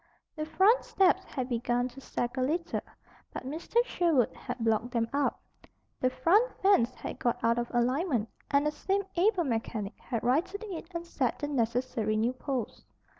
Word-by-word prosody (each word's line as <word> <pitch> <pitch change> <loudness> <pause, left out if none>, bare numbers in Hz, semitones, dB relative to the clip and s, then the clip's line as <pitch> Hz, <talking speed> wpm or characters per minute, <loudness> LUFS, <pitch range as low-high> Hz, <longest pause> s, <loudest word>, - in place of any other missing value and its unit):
The 305 -1 -4
front 405 +9 +4
steps 380 0 +3
had 255 -3 -4
begun 245 0 0
to 270 +2 -12
sag 240 -1 -3
a 260 - -1
little; 330 +6 0 0.5
but - - -6
Mr. 335 - 0
Sherwood 330 - +2
had 250 -1 -6
blocked 225 0 +1
them 235 -2 0
up. 285 0 +1 0.6
The 255 - +3
front 385 - +3
fence 385 -12 +4
had - - -7
got 240 - +1
out 230 +1 +3
of 240 - -2
alignment, 250 - +1 0.2
and 285 +1 +3
the 300 - +2
same 390 +6 -1
able 370 +1 +3
mechanic 225 -5 -3
had 230 -3 -3
righted 320 - +1
it 370 -6 -6
and 335 0 -3
set 265 -7 -1
the 290 - -3
necessary 235 -4 0
new 230 +3 +1
posts. 255 -3 -4
260 Hz, 175 wpm, -30 LUFS, 240-340 Hz, 0.6 s, front